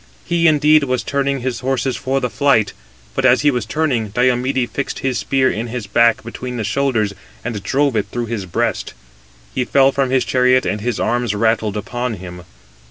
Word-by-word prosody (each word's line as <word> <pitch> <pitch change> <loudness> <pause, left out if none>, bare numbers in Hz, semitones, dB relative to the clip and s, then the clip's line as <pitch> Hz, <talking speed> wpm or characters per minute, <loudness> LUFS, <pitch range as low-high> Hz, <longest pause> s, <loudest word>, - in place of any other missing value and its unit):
He, 170 -1 +2
indeed, 150 -1 +4
was 130 -1 -1
turning 140 -1 -1
his 125 -1 -2
horses 130 -1 -1
for 135 +1 -1
flight; 125 -3 +2 0.4
but 135 - -1
as 130 -1 +5
he 145 0 +4
was 120 -5 -3
turning, 130 -5 0
Diomede 125 +3 +1
fixed 140 - -3
his 130 -2 0
spear 135 -1 +1
in 115 +3 -3
his 120 -2 -5
back, 115 +3 +3
between 125 +2 -6
his 110 - -2
shoulders, 110 -3 0 0.3
and 115 -4 -3
drove 135 +5 +1
it 105 -2 0
through 120 -1 -2
his 110 -4 -4
breast. 85 - -2 0.6
He 125 - 0
fell 135 +2 +4
from 135 -1 0
his 130 0 +2
chariot, 125 0 +3
and 105 - -2
his 120 +2 -2
arms 120 -3 0
rattled 110 -1 +1
upon 120 +3 -3
him. 90 -2 -10
125 Hz, 185 wpm, -18 LUFS, 110-135 Hz, 0.6 s, as